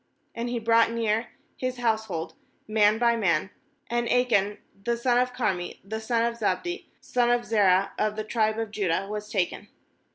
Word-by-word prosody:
18And 235 Hz, +1 st, -3 dB
he 240 Hz, -, -1 dB
brought 230 Hz, 0 st, +4 dB
near 230 Hz, 0 st, 0 dB, 0.3 s
his 255 Hz, 0 st, -3 dB
household 220 Hz, -8 st, -1 dB, 0.3 s
man 215 Hz, 0 st, +4 dB
by 235 Hz, 0 st, +3 dB
man; 190 Hz, -4 st, +1 dB, 0.4 s
and 240 Hz, 0 st, -1 dB
Achan, 210 Hz, -5 st, +2 dB, 0.3 s
the 235 Hz, +1 st, 0 dB
son 245 Hz, 0 st, +2 dB
of 250 Hz, 0 st, +1 dB
Carmi, 190 Hz, -8 st, -2 dB
the 220 Hz, +3 st, -5 dB
son 230 Hz, +1 st, +1 dB
of 235 Hz, 0 st, -2 dB
Zabdi, 215 Hz, -, 0 dB
the 355 Hz, +1 st, -5 dB, 0.2 s
son 245 Hz, -1 st, +1 dB
of 240 Hz, 0 st, +2 dB
Zerah, 200 Hz, -3 st, +3 dB
of 215 Hz, 0 st, +1 dB
the 215 Hz, -, -3 dB
tribe 220 Hz, 0 st, 0 dB
of 225 Hz, -2 st, -3 dB
Judah, 195 Hz, -3 st, 0 dB
was 210 Hz, 0 st, -5 dB
taken. 195 Hz, 0 st, -1 dB
220 Hz, 175 wpm, -26 LUFS, 205-235 Hz, 0.4 s, brought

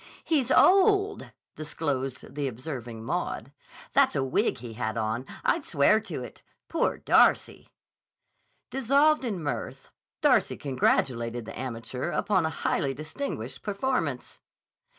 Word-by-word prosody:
"He's 280 Hz, -7 st, +1 dB
old." 400 Hz, +5 st, +4 dB, 0.2 s
disclosed 140 Hz, -4 st, -4 dB
the 145 Hz, -1 st, -2 dB
observing 120 Hz, -3 st, -6 dB
Maud. -, -, -3 dB, 0.4 s
"That's -, -, +4 dB
a 135 Hz, -, +1 dB
wig 135 Hz, -, +1 dB
he 120 Hz, -1 st, -8 dB
had 110 Hz, -1 st, -3 dB
on. 115 Hz, +4 st, -2 dB, 0.2 s
I'd 325 Hz, -, +2 dB
swear 165 Hz, -, +3 dB
to 225 Hz, -, -6 dB
it. -, -, -11 dB, 0.3 s
Poor -, -, 0 dB
Darcy!" -, -, +3 dB, 1.0 s
Dissolved 275 Hz, +3 st, +3 dB
in 200 Hz, -9 st, -3 dB
mirth, 145 Hz, -, -5 dB, 0.3 s
Darcy -, -, +3 dB
congratulated 120 Hz, -3 st, 0 dB
the -, -, -8 dB
amateur 125 Hz, +2 st, -4 dB
upon 185 Hz, -3 st, +1 dB
a 160 Hz, -, -6 dB
highly 135 Hz, -1 st, +1 dB
distinguished 155 Hz, -, -5 dB
performance. 200 Hz, -, -2 dB
145 Hz, 120 wpm, -27 LUFS, -, 1.0 s, old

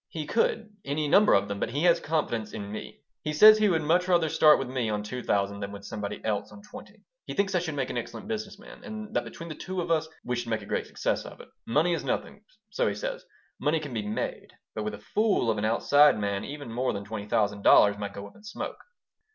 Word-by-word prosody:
"He 155 Hz, -2 st, -5 dB
could, 225 Hz, 0 st, 0 dB
any 150 Hz, +2 st, -1 dB
number 200 Hz, +8 st, +6 dB
of 100 Hz, 0 st, +2 dB
them, 100 Hz, 0 st, -4 dB
but -, -, -1 dB
he 145 Hz, +7 st, -2 dB
has 170 Hz, -1 st, +5 dB
confidence 120 Hz, -9 st, -2 dB
in 100 Hz, 0 st, -6 dB
me. 110 Hz, -, -8 dB, 0.2 s
He 155 Hz, -, -2 dB
says 215 Hz, +7 st, +9 dB
he 210 Hz, -1 st, +4 dB
would 165 Hz, -4 st, +1 dB
much 175 Hz, +4 st, +2 dB
rather 170 Hz, -3 st, +3 dB
start 150 Hz, 0 st, +6 dB
with 135 Hz, -, -3 dB
me 125 Hz, -3 st, -2 dB
on 105 Hz, -1 st, -2 dB
two 125 Hz, +4 st, -5 dB
thousand 100 Hz, -2 st, 0 dB
than 100 Hz, 0 st, -5 dB
with 100 Hz, 0 st, -9 dB
somebody 105 Hz, -1 st, -5 dB
else 105 Hz, -2 st, -1 dB
on 205 Hz, -, -13 dB
twenty. 210 Hz, -, -13 dB, 0.2 s
He -, -, -5 dB
thinks 195 Hz, -1 st, +1 dB
I 180 Hz, -, +3 dB
should 160 Hz, -4 st, -4 dB
make 135 Hz, -3 st, -2 dB
an 120 Hz, -, -1 dB
excellent 120 Hz, -, -8 dB
business 215 Hz, -3 st, -4 dB
man, 210 Hz, -, -14 dB
and 215 Hz, -2 st, -7 dB
that -, -, +2 dB
between 165 Hz, -, -9 dB
the 160 Hz, -, -5 dB
two 185 Hz, +4 st, -5 dB
of 170 Hz, -, -2 dB
us 160 Hz, -1 st, +2 dB, 0.2 s
we 125 Hz, -, -2 dB
should 120 Hz, -1 st, -4 dB
make 110 Hz, -2 st, -1 dB
a -, -, -10 dB
great -, -, -2 dB
success -, -, -1 dB
of -, -, -11 dB
it. -, -, -13 dB, 0.2 s
Money 155 Hz, +9 st, +2 dB
is 165 Hz, -, -2 dB
nothing 205 Hz, -, -3 dB, 0.3 s
so -, -, +1 dB
he -, -, -1 dB
says -, -, -4 dB, 0.4 s
money 155 Hz, +2 st, +1 dB
can 145 Hz, -4 st, -7 dB
be 110 Hz, -, -1 dB
made, 105 Hz, +1 st, -4 dB, 0.2 s
but 110 Hz, -, -4 dB
with 105 Hz, 0 st, -3 dB
a 105 Hz, -, -16 dB
fool 205 Hz, -, +2 dB
of 110 Hz, -, -2 dB
an 105 Hz, -, -1 dB
outside 145 Hz, +5 st, +5 dB
man 100 Hz, -1 st, -2 dB
even 145 Hz, -4 st, -7 dB
more 125 Hz, +2 st, 0 dB
than 100 Hz, 0 st, -5 dB
twenty 105 Hz, -1 st, -6 dB
thousand 105 Hz, -1 st, 0 dB
dollars 100 Hz, 0 st, +6 dB
might 100 Hz, -1 st, -4 dB
go 100 Hz, -, -7 dB
up 100 Hz, -, -13 dB
in -, -, -17 dB
smoke." 215 Hz, -, -6 dB
145 Hz, 255 wpm, -27 LUFS, -, 0.4 s, says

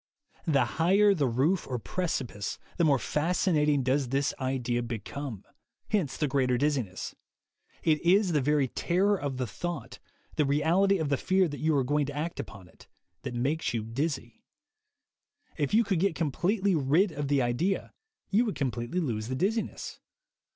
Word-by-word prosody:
The 140 Hz, -6 st, +3 dB
higher 190 Hz, -, +4 dB
the 150 Hz, -8 st, +1 dB
roof 140 Hz, +10 st, +1 dB
or 125 Hz, -, -2 dB
precipice 130 Hz, -, -3 dB, 0.2 s
the 170 Hz, -, +2 dB
more 145 Hz, -4 st, +5 dB
fascinat 155 Hz, +2 st, +1 dB
ing 145 Hz, -3 st, +2 dB
does 130 Hz, 0 st, +1 dB
this 140 Hz, +2 st, +1 dB
idea 125 Hz, -2 st, -1 dB
become; 120 Hz, +1 st, -6 dB, 0.5 s
hence 175 Hz, -11 st, 0 dB
the 150 Hz, -, +1 dB
greater 130 Hz, -2 st, +2 dB
the -, -, +1 dB
dizziness. 125 Hz, -9 st, -1 dB, 0.7 s
It 155 Hz, -2 st, +2 dB
is 185 Hz, +2 st, +4 dB
the 150 Hz, -3 st, +2 dB
very 145 Hz, 0 st, +2 dB
terror 190 Hz, +10 st, +1 dB
of 145 Hz, -8 st, -3 dB
the 130 Hz, -, -1 dB
thought, 170 Hz, -, -5 dB, 0.4 s
the 150 Hz, -, +4 dB
reality 165 Hz, +8 st, +3 dB
of 160 Hz, -4 st, -1 dB
the 140 Hz, -, +2 dB
fear 190 Hz, +3 st, +2 dB
that 145 Hz, -, -6 dB
you 155 Hz, 0 st, +2 dB
are 135 Hz, -, +3 dB
going 145 Hz, +2 st, +1 dB
to 145 Hz, 0 st, -6 dB
act 165 Hz, +3 st, -3 dB
upon 100 Hz, -3 st, -8 dB
it, 80 Hz, -, -19 dB, 0.3 s
that 120 Hz, -, -5 dB
makes 140 Hz, +3 st, -1 dB
you 110 Hz, -, -1 dB
dizzy. 140 Hz, +8 st, -3 dB, 1.1 s
If 145 Hz, -4 st, -1 dB
you 225 Hz, +2 st, +5 dB
could 195 Hz, -5 st, 0 dB
get 195 Hz, -2 st, +1 dB
com 155 Hz, -3 st, 0 dB
pletely 195 Hz, +5 st, +1 dB
rid 160 Hz, +7 st, +3 dB
of 145 Hz, -2 st, -3 dB
the 140 Hz, -2 st, +2 dB
idea, 140 Hz, +12 st, -1 dB, 0.4 s
you 215 Hz, +4 st, +4 dB
would 215 Hz, -, -2 dB
completely 125 Hz, +4 st, -2 dB
lose 110 Hz, -8 st, -2 dB
the 130 Hz, -, -2 dB
dizziness. 215 Hz, -, -2 dB
145 Hz, 175 wpm, -29 LUFS, 130-175 Hz, 1.1 s, more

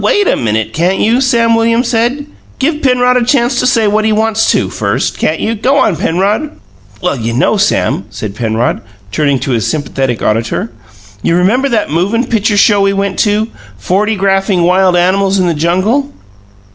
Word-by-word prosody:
"Well, -, -, +2 dB
wait 410 Hz, -2 st, +1 dB
a -, -, +2 dB
minute, 110 Hz, -1 st, -2 dB
can't 180 Hz, +4 st, 0 dB
you?" 235 Hz, +4 st, +1 dB
Sam 235 Hz, -3 st, +2 dB
Williams 230 Hz, +2 st, +1 dB
said. 245 Hz, +5 st, 0 dB, 0.3 s
"Give 300 Hz, +3 st, -1 dB
Penrod 250 Hz, -1 st, +2 dB
a 245 Hz, -, +1 dB
chance 245 Hz, 0 st, +1 dB
to 250 Hz, -, +1 dB
say 230 Hz, -3 st, +2 dB
what 215 Hz, +1 st, +1 dB
he 220 Hz, -, +1 dB
wants 220 Hz, +1 st, +1 dB
to, -, -, +1 dB
first, -, -, -2 dB
can't -, -, 0 dB
you? 225 Hz, -, -1 dB
Go 255 Hz, +6 st, 0 dB
on, 255 Hz, -9 st, +2 dB
Penrod." 200 Hz, -, -1 dB, 0.4 s
"Well, 180 Hz, -5 st, 0 dB
you 115 Hz, 0 st, -3 dB
know, 135 Hz, -, +1 dB
Sam," 100 Hz, -, 0 dB
said 105 Hz, -1 st, -6 dB
Penrod, 115 Hz, +1 st, -1 dB, 0.3 s
turning 140 Hz, +1 st, +1 dB
to 135 Hz, -, -3 dB
this 115 Hz, -2 st, -1 dB
sympathetic 135 Hz, -5 st, -2 dB
auditor; 115 Hz, +1 st, -1 dB, 0.5 s
"you 165 Hz, -, +1 dB
remember 225 Hz, +10 st, +1 dB
that 220 Hz, -, -1 dB
movin' 200 Hz, -, 0 dB
pitcher 215 Hz, -2 st, 0 dB
show 205 Hz, 0 st, +4 dB
we 195 Hz, 0 st, +2 dB
went 195 Hz, -1 st, -2 dB
to, 215 Hz, +1 st, +1 dB, 0.3 s
'Fortygraphing 195 Hz, -, 0 dB
Wild 185 Hz, +1 st, +3 dB
Animals 190 Hz, +2 st, +1 dB
in 185 Hz, -, +1 dB
the 170 Hz, -, +1 dB
Jungle'. 185 Hz, -, 0 dB
200 Hz, 185 wpm, -12 LUFS, 170-230 Hz, 0.5 s, show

